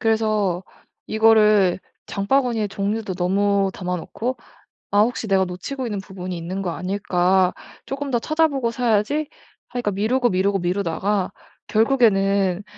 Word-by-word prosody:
그래서 215 -5 +1 0.4
이거를 215 -4 +4 0.3
장바구니에 225 +1 0
종류도 200 0 -2
너무 195 +2 +1
담아놓고 185 +7 -3 0.5
'아 205 - +4
혹시 230 +1 +1
내가 195 -2 +3
놓치고 245 +9 -5
있는 210 -4 -3
부분이 185 -2 -7
있는 175 +3 -4
거 180 - -2
아닐까?' 185 0 +1 0.3
쪼끔 275 +1 -4
더 240 - +2
찾아보고 285 -3 +1
사야지 240 +5 0 0.4
하니까 240 -4 -2
미루고 230 +6 +1
미루고 195 +2 +1
미루다가 185 +2 -1 0.3
결국에는 200 -5 +2
205 Hz, 310 characters per minute, -22 LUFS, 190-230 Hz, 0.5 s, 이거를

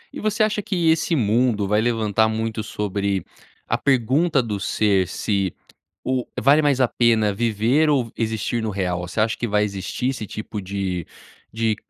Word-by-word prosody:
E - - -5
você 215 0 +1
acha 215 -1 0
que 175 -5 +1
esse 165 +1 +1
mundo 110 -3 +2
vai 105 +2 +2
levantar 110 -2 +1
muito 110 0 -2
sobre 100 -2 -2 0.4
a 120 - 0
pergunta 135 +3 +2
do 105 -3 -3
ser 100 -2 +1
se 95 0 -1 0.5
o 130 -1 0 0.2
vale 145 +3 +5
mais 140 -3 +2
a 125 - +4
pena 110 -4 +2
viver 115 +8 +2
ou 135 -5 +2
v 115 - -13
existir 110 +1 -2
no 110 - -2
real? 90 -3 -2
Você 90 - -5
acha 110 +1 +2
que 120 - -3
vai 105 -1 +2
existir 100 +5 -3
esse 125 -5 -4
tipo 105 0 -6
de 95 -3 -3 0.4
de 110 0 0
110 Hz, 175 wpm, -22 LUFS, 100-130 Hz, 0.5 s, vale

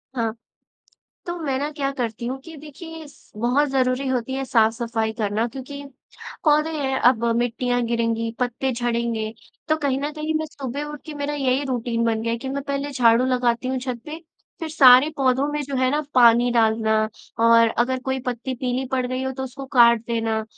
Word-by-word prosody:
हाँ, 225 -3 -1 0.9
तो 345 0 -3
मैं 275 -4 -1
ना 290 +2 -2
क्या 280 -2 -2
करती 235 -3 -4
हूँ 260 +2 -3
कि 325 -1 -10
देखिए, 320 +2 -10
इस 290 - -18
बहुत 250 +7 +2
ज़रूरी 260 0 0
होती 260 0 -1
है 270 0 -2
साफ-सफाई 225 -1 +1
करना 215 +1 0
क्योंकि 275 +3 -8 0.6
पौधे 305 0 +3
हैं, 275 -4 -1
अब 240 -1 +4
मिट्टियाँ 245 +1 0
गिरेंगी, 230 -1 -1
पत्ते 250 +1 -1
झड़ेंगे। 235 -2 -2 0.4
तो 310 - +3
कहीं 280 -3 -1
न 290 +1 -2
कहीं 310 +1 -3
मैं 315 - -3
सुबह 280 -1 -5
उठ 295 0 -8
के 310 - -7
मेरा 290 0 -3
यही 270 -1 0
रुटीन 235 -2 -1
बन 225 -1 0
गया 230 0 -1
है 235 - -2
कि 265 - -6
मैं 275 +1 -3
पहले 280 0 -3
झाड़ू 240 -2 +4
लगाती 250 -1 0
हूँ 260 0 -1
छत 250 -2 -4
पे, 310 +1 -6 0.4
फिर 325 - -3
सारे 265 -2 +7
पौधों 265 0 +2
में 295 - -1
जो 275 -1 -4
है 255 0 +2
ना 295 +2 +1
पानी 240 0 +6
डालना 220 -1 +2 0.4
और 230 0 +6
अगर 260 +2 +1
कोई 265 0 -1
पत्ती 250 +1 -3
पीली 250 +1 -2
पड़ 255 -1 +1
गई 255 +1 -3
हो 265 0 -2
तो 265 0 -5
उसको 270 +1 -8
काट 235 -1 +7
देना 225 -2 -1
255 Hz, 195 wpm, -23 LUFS, 235-280 Hz, 0.9 s, सारे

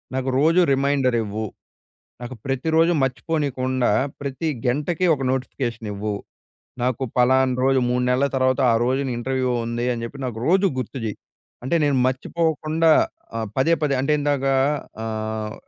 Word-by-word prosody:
నాకు 130 0 -1
రోజు 165 +5 +4
రిమైండరివ్వు. 125 -6 0 0.8
నాకు 125 +1 -6
ప్రతి 135 +3 -1
రోజు 165 +1 +5
మర్చిపోనికుండా, 130 -2 0 0.3
ప్రతి 140 +4 -3 0.2
గెంటకి 150 +8 0
ఒక 135 - -8
నోటిఫికేషనివ్వు. 115 -5 -3 0.7
నాకు 125 +1 0
ఫలానా 130 +1 +4
రోజు 135 0 +3
3 125 0 +1
నెలల 130 +3 +2
తర్వాత, 130 +1 +2
ఆ - - +3
రోజున 135 +1 0
ఇంటర్వ్యూ 130 +1 -1
ఉంది 120 +1 -2
అని 115 -1 -5
చెప్పి, 115 - -9
నాకు 120 -3 -4
రోజు 190 +3 +4
గుర్తు 130 +2 -5
చెయ్యి. 105 - -4 0.5
అంటే, 150 - +1
నేను 140 -2 +2
మర్చిపోకుండా 160 +4 +1 0.5
ఆహ్, 110 - -2
పదే, 160 +6 +3
పదే 145 -2 +1
అంటే 135 +3 0
ఇందాక 145 -2 0 0.6
ఆహ్, 110 -1 -3
130 Hz, 140 wpm, -22 LUFS, 120-145 Hz, 0.8 s, రోజు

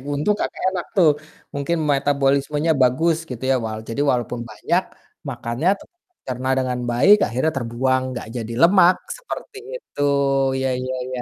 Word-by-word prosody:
untung 180 +9 +1
Kakak - - -3
enak 180 -2 -3
tuh, 170 -5 +6 0.4
mungkin 145 +4 -1
metabolismenya 140 +2 +1
bagus 155 +6 +3
gitu 125 0 -7
ya - - +4
walau 110 0 -4
jadi 140 +5 -2
walaupun 125 -1 -2
banyak 105 - 0 0.5
makannya 120 +9 -1
tetap 350 - -19 0.3
tercerna 130 0 -3
dengan 125 -1 -1
baik, 140 +13 +6
akhirnya 130 +7 0
terbuang, 130 +2 0 0.2
gak - - -7
jadi 115 0 -5
lemak, 180 +1 +6 0.2
seperti - - -8 0.2
itu, 315 - -9 0.6
iya 130 0 0
iya 130 0 -3
iya. 130 -1 -4
135 Hz, 150 wpm, -21 LUFS, 125-160 Hz, 0.6 s, tuh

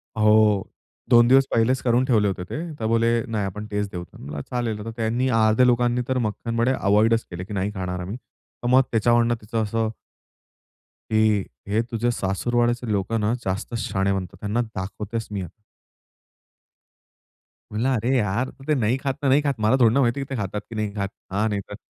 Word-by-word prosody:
हो, 105 -2 +4 0.4
2 120 -1 +7
दिवस 135 +2 +6
पहिलेच 120 +3 +2
करून 125 +1 +2
ठेवले 110 -6 +3
होते 95 -2 -2
ते. 95 - -6 0.2
तर 110 - -2
बोले, 115 +1 +2 0.2
"नाही 110 -3 -1
आपण 105 +2 -5
तेच 105 0 -1
देऊ" 90 -1 -5
म्हणलं 70 +1 -7
चालेल, 120 -4 -2
आता 115 +2 -6
त्यांनी 115 +3 0
अर्ध्या 110 +2 +4
लोकांनी 120 0 +2
तर 130 - 0
मक्खनवडे 115 +3 -1
अव्हॉइडच 110 +3 +3
केले, 90 +1 -5
"की 100 - -8
नाही 100 +1 -1
खाणार 90 -1 -3
आम्ही", 95 +6 -5
तर 125 - -11
मग 130 +2 +6
त्याच्यावरून 120 +1 +3
तिचं 110 +1 -2
असं 110 +1 -1 1.2
."की 110 -2 +3 0.3
हे 110 +2 +3
तुझे 120 +1 0
सासुरवाडीचे 120 +4 0
लोक 100 +1 -1
ना 105 +2 +1
जास्त 95 +5 -3
शहाणे 100 -3 0
बनतात, 95 -3 -5
त्यांना 105 +3 0
दाखवतेच 110 +1 -5
मी 100 -2 -3
आता". 90 +4 -10 2.1
म्हंटलं, 110 +5 0
"अरे 115 +2 -1
यार! 115 +3 0 0.2
ते 155 - +3
नाही 115 +4 +1
खात, 135 -1 -2
तर 140 - 0
नाही 140 +3 +5
खात. 145 -1 0
मला 110 +3 +3
थोडी 115 -2 +5
ना 140 - +3
माहिती 120 +1 +1
आहे 135 - -3
की - - -23
ते 130 - -2
खातात 100 +1 -3
की 115 - -8
नाही 105 -2 -2
खात, 100 -2 -2 0.2
हा 105 +3 +1
नाही 100 -2 -1
तर." 105 - -6
110 Hz, 190 wpm, -23 LUFS, 105-120 Hz, 2.1 s, 2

